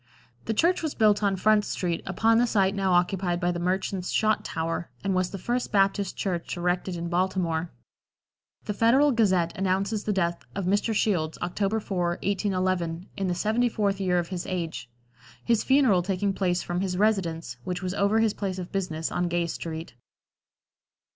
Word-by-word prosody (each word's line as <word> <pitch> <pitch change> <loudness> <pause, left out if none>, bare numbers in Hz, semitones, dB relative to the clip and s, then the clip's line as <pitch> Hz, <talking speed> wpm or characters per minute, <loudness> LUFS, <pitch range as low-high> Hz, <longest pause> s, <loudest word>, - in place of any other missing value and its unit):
The 225 - -1
church 345 +9 +3
was 315 -3 -3
built 210 -2 +4
on 200 -2 +2
Front 210 +2 +3
street, 175 -4 -2
upon 225 +5 +3
the 245 - +3
site 195 -4 +2
now 195 -2 +1
occupied 175 0 +1
by 175 0 +1
the 175 - -3
Merchants' 185 +1 -1
Shot 215 0 +2
Tower, 165 +1 -3
and 195 -1 0
was 185 -1 +1
the 195 - -6
first 240 +6 -2
Baptist 195 -1 +1
Church 175 -3 -3
erected 180 +1 -1
in 170 0 -4
Baltimore. 175 -2 0 1.0
The 210 - -2
Federal 255 +8 +4
Gazette 190 -8 +2
announces 195 +2 0
the 215 - +1
death 170 -3 -1
of 195 -2 -2
Mr. 205 +4 +1
Shields, 165 -8 0
October 195 +4 0
4, 175 -4 -1
1811, 185 -3 -1
in 195 -2 -2
the 180 - 0
seventy 220 +6 +1
fourth 200 -3 0
year 180 -2 +2
of 175 -1 -1
his 180 -2 -4
age; 170 -8 -4 0.6
his 230 -2 +2
funeral 260 -9 +4
taking 195 +2 -1
place 180 -2 0
from 175 +1 -2
his 185 -2 -2
residence, 170 - 0
which 180 +4 -4
was 180 0 -2
over 200 +2 +2
his 220 -2 +2
place 190 -3 -3
of 180 -1 -6
business, 165 -5 -2
on 180 - 0
Gay 175 0 0
street. 165 -1 -6
190 Hz, 180 wpm, -26 LUFS, 175-205 Hz, 1.0 s, built